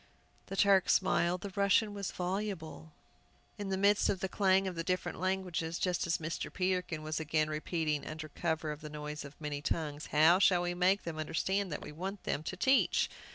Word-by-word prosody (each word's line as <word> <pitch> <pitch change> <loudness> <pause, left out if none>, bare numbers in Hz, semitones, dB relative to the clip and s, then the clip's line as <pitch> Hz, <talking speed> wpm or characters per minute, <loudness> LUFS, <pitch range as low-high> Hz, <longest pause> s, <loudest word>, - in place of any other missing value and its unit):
The 195 - -5
Turk 195 -1 +4
smiled, 180 -1 +2
the 200 0 -6
Russian 200 +1 +3
was 200 -2 -3
voluble. 180 -4 -4 0.7
In 200 -1 -4
the 190 - 0
midst 200 +1 +3
of 190 - 0
the 190 - -1
clang 190 0 +3
of 185 - -3
the 165 -1 -3
different 180 -1 -2
languages, 180 -3 -1
just 180 -2 0
as 170 - +1
Mr. 165 +1 -4
Peterkin 180 -4 -1
was 155 +1 -2
again 155 0 0
repeating, 155 -1 -1
under 155 0 -6
cover 160 0 -2
of 150 +1 -7
the 150 - -7
noise 150 0 -6
of 140 0 -12
many 150 -2 -4
tongues, 150 0 -3
"How 160 +4 +5
shall 180 -2 +4
we 175 0 -1
make 185 +3 +2
them 160 -2 -5
understand 190 +5 -1
that 150 - -4
we - - -8
want 190 +6 -6
them 145 - -1
to 185 +4 -5
teach?" 265 +6 +3
175 Hz, 200 wpm, -32 LUFS, 155-190 Hz, 0.7 s, How